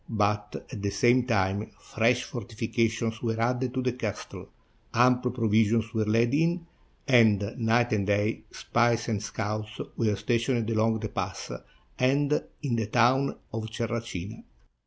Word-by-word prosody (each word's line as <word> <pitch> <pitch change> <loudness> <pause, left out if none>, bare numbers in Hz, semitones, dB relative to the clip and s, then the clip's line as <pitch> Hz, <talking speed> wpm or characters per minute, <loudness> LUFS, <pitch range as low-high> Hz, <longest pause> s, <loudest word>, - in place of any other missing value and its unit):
But 105 -1 -1
at 110 -6 -6
the 100 - 0
same 120 +5 +3
time 100 -2 0
fresh 120 +2 +1
fortifications 115 0 -2
were 115 -2 -1
added 125 +2 0
to 130 - 0
the 125 - +1
castle, 110 -5 -6 0.5
ample 125 +1 +4
provisions 115 -1 +2
were 110 -2 +1
laid 115 +3 +2
in, 170 +3 +1 0.4
and, 110 -5 +4
night 115 +1 +2
and 100 -2 0
day, 105 +2 +1
spies 120 -1 +1
and 105 -3 -1
scouts 105 0 -4 0.2
were 110 -3 +1
stationed 115 +2 0
along 110 0 +1
the 110 - -3
pass - - -4 0.5
and 140 +3 +2 0.2
in 125 -5 0
the 110 -2 -1
town 125 +5 +3 0.2
of 110 0 -4
Terracina. 115 -3 -4
115 Hz, 140 wpm, -27 LUFS, 105-120 Hz, 0.5 s, ample